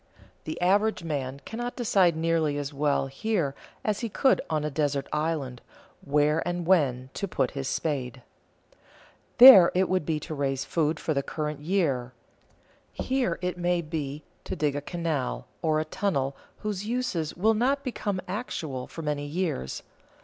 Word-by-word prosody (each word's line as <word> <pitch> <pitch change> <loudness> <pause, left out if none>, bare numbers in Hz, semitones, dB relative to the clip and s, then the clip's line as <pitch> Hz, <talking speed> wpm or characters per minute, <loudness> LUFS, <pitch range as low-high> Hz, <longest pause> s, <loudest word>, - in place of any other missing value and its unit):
The 155 - -5
average 205 +1 +2
man 140 -4 -3
cannot 240 +2 -5
decide 195 -8 +3
nearly 160 -3 +1
as 145 0 -4
well 145 -1 +1
here 150 +1 -1 0.3
as 210 -1 0
he 230 - -3
could 265 +6 +3
on 155 -1 0
a 150 - -2
desert 145 -1 0
island 150 -5 -2 0.4
where 150 +2 +2
and 175 0 -3
when 135 -8 +2
to 200 - -3
put 135 -8 0
in 140 - -6
his 135 - -3
spade. 135 -4 -2 1.1
There 240 -9 +11
it 185 0 +3
would 185 -2 +1
be 155 0 -1
to 155 - -6
raise 135 -2 -1
food 155 -1 0
for 155 - -1
the 140 - +1
current 150 +1 -4
year; 145 -7 0 0.8
here 255 -10 -1
it 180 0 -2
may 175 0 +1
be 150 -2 -4 0.2
to - - -4
dig 150 -4 0
a 145 - -2
canal 160 -4 -3 0.2
or 155 -2 +2
a 155 - -1
tunnel 140 -6 -1 0.3
whose 210 -2 -3
uses 215 -9 -2
will 220 +5 +3
not 265 +6 +1
become 205 -7 -2
actual 160 - -4
for 165 - -8
many 145 -1 -2
years. 150 - -3
160 Hz, 165 wpm, -27 LUFS, 145-185 Hz, 1.1 s, There